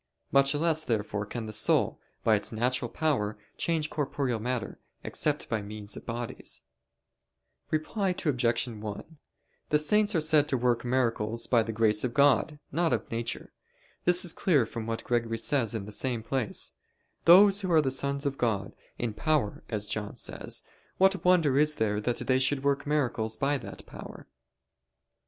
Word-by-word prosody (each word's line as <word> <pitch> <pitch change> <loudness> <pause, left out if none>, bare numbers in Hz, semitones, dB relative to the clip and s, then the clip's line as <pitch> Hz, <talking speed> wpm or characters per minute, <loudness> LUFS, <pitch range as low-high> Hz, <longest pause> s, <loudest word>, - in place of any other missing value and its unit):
Much 140 +1 +4
less 160 0 +1
therefore 105 -4 -2
can 115 +1 -5
the 110 - -6
soul, - - +2 0.2
by 110 - +4
its 100 -1 -2
natural 120 +2 0
power, 115 -11 0 0.2
change 160 -2 -1
corporeal 140 -5 -1
matter, 120 0 -3 0.2
except - - -1
by 110 - -1
means 105 0 -6
of - - -10
bodies. 120 0 -5 1.1
Reply 190 +6 -1
Obj. 125 -9 0
1: 110 +7 -7 0.5
The 150 - +4
saints 210 +7 +2
are - - +4
said 155 -1 +3
to 130 - +1
work 120 -1 +1
miracles 115 -3 0
by 120 -2 +3
the 115 0 -3
power 115 +1 +1 0.2
of 125 -2 -1
grace, 145 +2 +4
not 165 +3 +1
of - - -3
nature. 115 +1 -4 0.5
This 180 +1 +4
is 170 - 0
clear 150 - +2
from 115 0 -6
what 115 0 -3
Gregory 115 -1 0
says 115 -1 +1
in 105 -3 -4
the 105 - -9
same 120 +1 -2
place: 125 -3 -1 0.5
"Those 195 +3 +7
who 185 -2 -2
are 155 -5 +4
sons 140 +2 -2
of 140 -1 -2
God, 105 -5 -1 0.2
in 120 -3 -2
power, 140 -2 0
as 105 -2 -2
John 105 0 -3
says - - -5 0.3
what 190 -2 +3
wonder 165 -7 +4
is 150 0 +3
there 105 -3 0
that 120 +2 -1
they 130 0 +3
should 135 +1 +1
work 140 0 0
miracles 120 -7 0
by 140 +1 +1
that - - -10
power?" - - -10
130 Hz, 165 wpm, -28 LUFS, 115-150 Hz, 1.1 s, Those